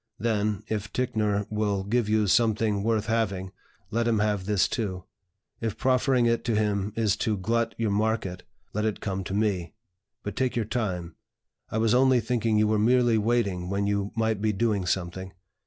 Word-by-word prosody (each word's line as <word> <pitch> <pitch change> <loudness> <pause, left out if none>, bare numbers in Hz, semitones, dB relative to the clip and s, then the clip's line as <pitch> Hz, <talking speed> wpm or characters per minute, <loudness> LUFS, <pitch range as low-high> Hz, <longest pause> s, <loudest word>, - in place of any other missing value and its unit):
Then, 105 -1 0
if 105 -2 -3
Ticknor 105 -5 0
will 105 -2 0
give 110 +2 0
you 110 0 +3
something 110 0 +2
worth 110 0 +1
having, 100 -4 -1 0.4
let 115 +1 0
him 115 -2 +2
have 105 -2 0
this 105 -3 +3
too; 95 -6 -3 0.6
if 115 -3 -3
proffering 130 -1 +2
it 115 0 +1
to 115 -3 +1
him 105 -1 0
is 110 -3 +2
to 110 -2 0
glut 115 +4 0
your 110 -3 0
market, 105 -3 -1 0.3
let 105 - -1
it 110 -1 -1
come 95 -2 -3
to 95 - -3
me. 100 -3 -1 0.5
But 105 -2 -5
take 130 0 0
your 115 -2 0
time. 90 -8 -3 0.5
I - - -3
was 110 0 +2
only 130 0 +5
thinking 115 -2 0
you 105 0 +4
were 110 0 +2
merely 120 0 +4
waiting 100 -5 0
when 100 +1 0
you 100 0 -1
might 110 -2 0
be 110 0 +2
doing 105 -2 0
something. 95 +1 -2
105 Hz, 180 wpm, -27 LUFS, 100-115 Hz, 0.6 s, only